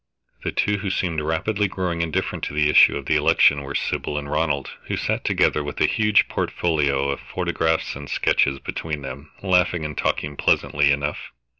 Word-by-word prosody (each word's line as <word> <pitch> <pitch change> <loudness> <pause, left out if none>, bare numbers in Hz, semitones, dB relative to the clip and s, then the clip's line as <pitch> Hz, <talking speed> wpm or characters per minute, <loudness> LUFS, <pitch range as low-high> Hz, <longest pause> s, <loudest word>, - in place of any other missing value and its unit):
The - - -2
two 105 0 0
who 100 0 -3
seemed 85 -4 -1
rapidly 90 +7 0
growing 90 -3 -3
indifferent 80 -2 -2
to - - -6
the 75 -1 +3
issue - - +6
of 70 - -7
the - - +1
election 70 0 +4
were 70 0 -6
Sybil 75 - -2
and 70 -1 -4
Ronald, 75 -3 -1 0.2
who - - -2
sat - - -2
together 75 - +1
with 75 0 -6
a - - +4
huge 105 -1 +3
portfolio 70 -5 0
of 70 - -2
photographs 80 0 -1
and 70 0 -9
sketches 70 0 +1
between 75 +1 -5
them, 70 +4 -8
laughing 90 -3 +2
and 75 -1 -5
talking 75 -1 -1
pleasantly 70 0 +2
enough. 70 +1 -2
75 Hz, 180 wpm, -22 LUFS, 70-85 Hz, 0.2 s, issue